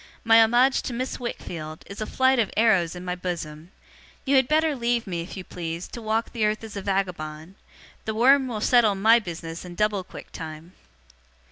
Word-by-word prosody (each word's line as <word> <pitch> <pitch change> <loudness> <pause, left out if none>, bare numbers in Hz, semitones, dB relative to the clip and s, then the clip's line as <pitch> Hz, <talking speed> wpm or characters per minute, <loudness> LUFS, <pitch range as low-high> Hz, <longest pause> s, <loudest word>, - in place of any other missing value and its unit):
My 225 0 +6
homage 245 +4 +4
to 250 - -5
Miss 255 +2 -3
Wickfield, 160 -10 -6
is 200 +2 -9
a 215 - -2
flight 260 -1 +2
of 220 - +2
arrows 195 -7 +3
in 180 0 -8
my 180 - -2
bosom. 170 -3 -5 0.6
You 275 0 +2
had 265 -2 +4
better 310 0 +2
leave 235 -1 0
me, 175 -4 -3
if 175 +4 -8
you 190 - -6
please, 170 -1 -6
to 235 - -8
walk 220 +1 -1
the 230 -3 -1
earth 215 +1 0
as 220 -2 -9
a 200 - -4
vagabond. 180 -4 -3 0.5
The 220 - -3
worm 265 +4 +5
will 220 -4 -4
settle 225 -3 +4
my 220 +4 +5
business 165 -4 -7
in 175 -1 -9
double 210 -1 0
quick - - -12
time. 160 +2 -8
210 Hz, 200 wpm, -25 LUFS, 175-235 Hz, 0.6 s, My